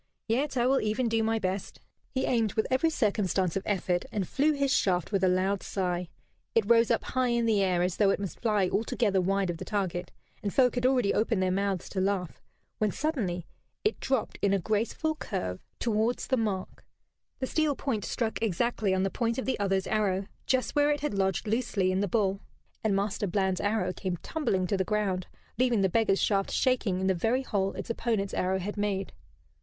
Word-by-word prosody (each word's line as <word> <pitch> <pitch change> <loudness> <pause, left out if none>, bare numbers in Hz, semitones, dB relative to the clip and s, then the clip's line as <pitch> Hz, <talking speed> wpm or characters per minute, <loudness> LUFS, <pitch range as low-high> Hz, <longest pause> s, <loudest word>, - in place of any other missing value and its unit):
"Yet 265 +4 0
I 240 - +3
will 265 +1 +3
even 215 +3 0
do 225 0 +1
my 225 0 +1
best." 190 -2 -3 0.3
He 260 - -1
aimed 225 -4 +1
with 220 - +1
every 265 +6 +3
circumstance 200 - 0
of 195 - 0
effort, 180 -3 0
and 195 -4 -2
flew 300 +3 +2
his 280 -1 +1
shaft 180 -1 +1
with 195 -2 +1
a - - +5
loud 185 +2 +1
sigh. 180 -2 -2 0.5
It 225 -3 +4
rose 230 0 +5
up - - +2
high 255 -1 0
in 235 -1 +1
the 215 -3 +3
air 180 -2 +2
as 180 0 -1
though 205 -2 +4
it 195 - +1
must 195 -3 -5
fly 210 -5 +2
altogether 205 -1 +1
wide 195 0 +1
of 170 - -6
the - - -6
target, 185 -4 -2 0.3
and 200 - -2
folk 250 +1 +4
had 245 0 +2
already 250 -6 +2
opened 215 -3 +1
their 185 - +1
mouths 195 -1 -1
to 190 - -2
laugh, 190 -3 -1 0.4
when 215 - +2
suddenly 200 - -2 0.4
it 430 - 0
dropped 265 -4 -1
in 200 -1 +3
a - - +4
graceful 220 - 0
curve 90 - -4 0.2
towards 225 +1 0
the 260 - +1
mark, 210 -6 -3 0.5
the 260 - -2
steel 305 +1 +1
point 235 -8 -2
struck 225 -2 -2
exactly 215 -1 +1
on 190 - +1
the 195 - 0
point 235 -1 -1
of 260 - -2
the 260 - -1
other's 195 -2 +1
arrow, 200 -3 0 0.2
just 260 +2 +1
where 290 0 +4
it 295 -1 0
had 295 - -1
lodged 190 0 0
loosely 215 -4 0
in 185 - 0
the 205 - +1
bull, 195 -1 +1 0.4
and 215 -3 +2
Master 200 +1 -1
Bland's 190 0 0
arrow 205 -3 0
came 185 -2 -3
tumbling 200 - 0
to 195 +2 0
the 190 - +1
ground, 190 -2 -1 0.3
leaving 245 -4 +3
the 190 - +4
beggar's 215 0 +2
shaft 195 -2 +1
shaking 240 -8 +1
in 190 - -1
the 190 - +3
very 225 +9 +1
hole 195 -6 -1
its - - -5
opponent's 225 -4 -1
arrow 185 +1 +1
had 200 +3 -4
made. 200 -2 -1
205 Hz, 210 wpm, -29 LUFS, 190-235 Hz, 0.5 s, a